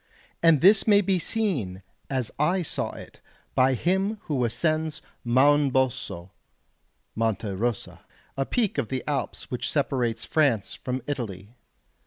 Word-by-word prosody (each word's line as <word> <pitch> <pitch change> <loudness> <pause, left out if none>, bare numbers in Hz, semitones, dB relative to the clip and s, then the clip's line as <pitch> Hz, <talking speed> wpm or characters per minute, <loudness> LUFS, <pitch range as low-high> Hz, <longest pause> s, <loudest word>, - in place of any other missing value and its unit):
And 165 -4 +5
this 195 +5 +6
may 205 -1 +6
be 190 -2 +1
seen, 150 - -2 0.3
as 130 -4 -1
I 175 +5 +2
saw - - -2
it, - - -12 0.3
by 130 0 +3
him 190 - 0
who 140 -5 -1
ascends 155 +6 -1 0.2
Mounboso 130 -8 +2 0.8
(Monte 110 -1 -1
Rosa), 110 +4 -3 0.4
a 135 0 -1
peak 230 -6 0
of - - -1
the 130 +1 -3
Alps 145 -2 -3
which 125 - -2
separates 125 -6 0
France 140 -10 +1
from 130 -1 -4
Italy. 110 -7 -5
135 Hz, 130 wpm, -26 LUFS, 115-165 Hz, 0.8 s, this